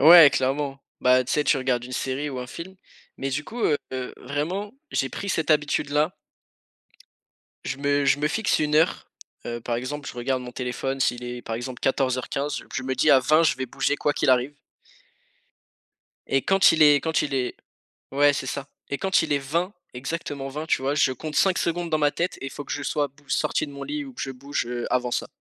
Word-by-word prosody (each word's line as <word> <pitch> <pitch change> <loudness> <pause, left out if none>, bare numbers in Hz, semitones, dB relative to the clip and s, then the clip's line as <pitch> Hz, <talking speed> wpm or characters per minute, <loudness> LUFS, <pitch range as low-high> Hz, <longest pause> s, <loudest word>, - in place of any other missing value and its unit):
ouais, 160 0 +10
clairement. 135 +1 -1 0.2
Bah, 125 0 +4
tu 130 - -3
sais, 150 - +2
tu 140 - +4
regardes 130 -2 0
une 125 - -9
série 135 +3 -2
ou 130 - -5
un 125 - -5
film, 170 +8 -8 0.4
mais 135 - -2
du 145 +3 -2
coup, 240 +8 -7
heu, 145 - +3 0.4
vraiment 180 +9 -3 0.2
j'ai 135 - 0
pris 200 - -5
cette 160 -5 0
habitude 150 -1 +2
là, 150 +4 +1 1.5
je - - -3
me 145 0 +1
je 140 +1 +3
me 150 - +2
fixe 220 +6 +1
1 150 0 +2
heure, 160 - +2 0.4
heu, 120 0 -4
par 120 - -2
exemple 140 +4 -4
je - - -8
regarde 130 +2 -1
mon 125 0 -8
téléphone 130 +2 -3
s'il 120 -1 +1
est, 120 0 -6
par 115 - -4
exemple 120 +1 -6
14:15, 135 +2 0
je 130 - -2
me 130 0 -2
dis: 150 +4 +3
«À 135 - +8
20 155 +5 +4
je 160 - +3
vais 130 0 -3
bouger 145 +3 0
quoi 145 - +1
qu'il 135 - +2
arrive» 130 +3 +2 1.7
et 135 0 +1
quand 195 0 +5
il 160 -1 +4
est 145 -1 +7
quand 160 +3 +1
il 145 - -2
est 125 -2 -1 0.6
ouais 145 +1 +5
c'est 140 - -3
ça 135 +2 -4 0.2
et 140 - -1
quand 190 -1 +2
il 160 - -1
est 145 - +3
20, 165 +8 -1 0.2
exactement 140 +1 -4
20 150 +3 -5
tu 145 - +1
vois, 140 +2 +1
je 140 -3 +3
compte 150 +4 -6
5 190 -2 +4
secondes 170 0 -1
dans 155 - +2
ma 145 -1 +3
tête 180 +2 -2
et - - -3
il - - -5
faut 145 - -7
que - - -5
je 145 - -3
sois 145 +1 0
bou 140 +2 -25
sorti - - 0
de 145 - -10
mon 140 - -8
lit 295 0 -3
ou 270 - -10
que - - -8
je 135 - -3
bouge, 140 0 -3
heu, 120 0 -3
avant 125 -1 +1
ça. - - -1
140 Hz, 225 wpm, -25 LUFS, 130-155 Hz, 1.7 s, ouais